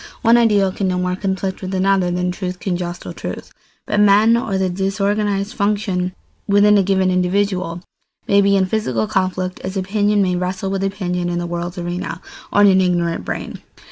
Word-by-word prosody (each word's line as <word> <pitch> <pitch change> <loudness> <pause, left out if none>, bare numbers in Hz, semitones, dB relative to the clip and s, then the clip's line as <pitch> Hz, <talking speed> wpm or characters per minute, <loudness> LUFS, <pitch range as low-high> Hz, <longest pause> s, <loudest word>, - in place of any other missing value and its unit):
One 230 0 +6
ideal 210 -5 +3
can 195 0 -2
no 185 -1 0
more 180 0 -1
conflict 190 0 -3
with 190 0 -4
another 190 -1 +2
than 180 +1 -1
truth 180 0 -5
can 185 -3 -2
jostle 175 0 -5
truth; - - -7 0.3
but 210 - 0
men, 210 +3 +5
or 220 -4 -1
the 190 0 +1
disorganised 200 +2 -1
functions 200 -4 -1 0.3
within 205 +1 +5
a - - +5
given 190 -1 +1
individual, 185 -1 0 0.5
may 200 0 +4
be 200 0 +3
in 190 -1 +3
physical 155 - -1
conflict, 185 - -2
as 190 +1 -5
opinion 205 +2 +1
may 180 -1 0
wrestle 185 +2 -3
with 195 0 -2
opinion 180 -3 -2
in 175 - -2
the 175 - -2
world's 175 +1 -4
arena 175 -1 -4 0.3
or 205 - +3
in 205 - +7
an 190 0 +4
ignorant 175 - 0
brain. - - -5
190 Hz, 185 wpm, -19 LUFS, 180-200 Hz, 0.5 s, in